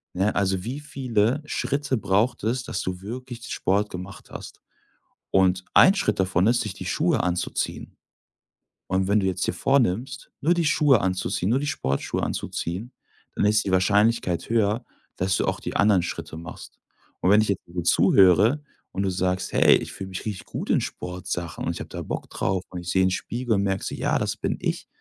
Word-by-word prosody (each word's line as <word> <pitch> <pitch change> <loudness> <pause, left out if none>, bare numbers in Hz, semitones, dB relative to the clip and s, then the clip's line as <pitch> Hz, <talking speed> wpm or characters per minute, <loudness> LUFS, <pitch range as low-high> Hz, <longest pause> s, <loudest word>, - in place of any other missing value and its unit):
Ne, 95 +3 +1
also, 95 -2 0
wie 130 +6 -4
viele 130 -2 0
Schritte 140 -2 -1
braucht 105 +3 +1
es, 120 +3 0
dass 95 - -3
du 90 0 -4
wirklich 120 +3 -7
Sport 100 +3 +1
gemacht 90 +2 -9
hast - - -10 0.7
und 90 -1 +3
ein 195 - +7
Schritt 200 - 0
davon 95 0 +2
ist, 120 +1 +3
sich 105 -5 -4
die 95 - -7
Schuhe 155 - +1
anzuziehen 90 -1 -2 0.9
und 95 0 0
wenn 105 +2 +3
du 95 - 0
jetzt 95 0 -1
dir - - 0
vornimmst, 135 0 0
nur 165 +5 +3
die 170 -2 +1
Schuhe 145 -5 +4
anzuziehen, 95 0 -1
nur 130 - +3
die 145 - -3
Sportschuhe 70 - -2
anzuziehen, 95 +9 -3 0.4
dann - - +1
ist 105 0 +3
die 95 - -1
Wahrscheinlichkeit 100 0 +2
höher, 115 +1 +1 0.3
dass 95 0 +1
du - - 0
auch - - -1
die - - -6
anderen 100 -3 +4
Schritte 80 -2 -5
machst 85 +2 -10 0.4
und 90 - +2
wenn 105 - +6
ich 110 - -1
jetzt 100 - -1
dir 85 - -16
so 90 - 0
zuhöre 100 - +5 0.3
und 95 - -2
du 95 - +1
sagst: 90 +1 -1
„Hey, - - +6
ich - - -7
fühle 95 - -7
mich 95 - -6
richtig 105 -4 -5
gut - - -6
in - - +3
Sportsachen 90 -2 -5
und - - -1
ich - - -7
habe - - -8
da - - -6
Bock - - -5
drauf 95 -1 -1
und 90 -1 -6
ich 85 - -7
sehe 95 +1 +3
in 95 - +2
Spiegel 120 +5 -2
und 100 - +1
merke 95 -1 -1
so: - - -4
‚Ja, - - 0
das - - -1
bin - - -2
ich'“, - - -2
100 Hz, 200 wpm, -25 LUFS, 90-120 Hz, 0.9 s, ein